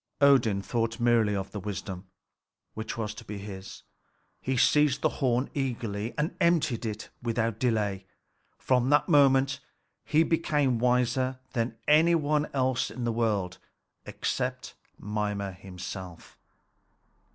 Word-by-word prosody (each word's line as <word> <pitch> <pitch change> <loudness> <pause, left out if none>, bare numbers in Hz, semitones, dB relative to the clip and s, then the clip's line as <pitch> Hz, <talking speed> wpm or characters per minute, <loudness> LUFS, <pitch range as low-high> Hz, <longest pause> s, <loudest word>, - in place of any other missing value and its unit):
Odin 120 -8 +4
thought 115 +1 -1
merely 115 -3 +3
of 95 0 -4
the 105 - -5
wisdom 95 -1 -6 0.7
which 110 +1 -5
was 110 -2 -3
to 105 - -10
be 105 - -7
his. 100 -1 -9 0.6
He 130 0 -1
seized 145 +1 +3
the - - +4
horn 125 0 +2
eagerly, 115 -5 -3
and 155 +3 -1
emptied 155 -9 +2
it 105 0 -6
without 115 -2 -1
delay. 105 -6 0 0.5
From 125 0 +1
that 145 0 +4
moment 135 -4 +4 0.4
he 155 +2 +3
became 150 -7 +1
wiser 125 +1 +1 0.2
than 115 -2 -1
any 160 +3 +5
one 150 -1 +1
else 130 -2 0
in 125 - -6
the 120 - 0
world 105 -6 -1 0.5
except 125 0 -3 0.2
Mimer 105 -1 -3
himself. 90 -1 -9
120 Hz, 130 wpm, -28 LUFS, 105-135 Hz, 0.7 s, any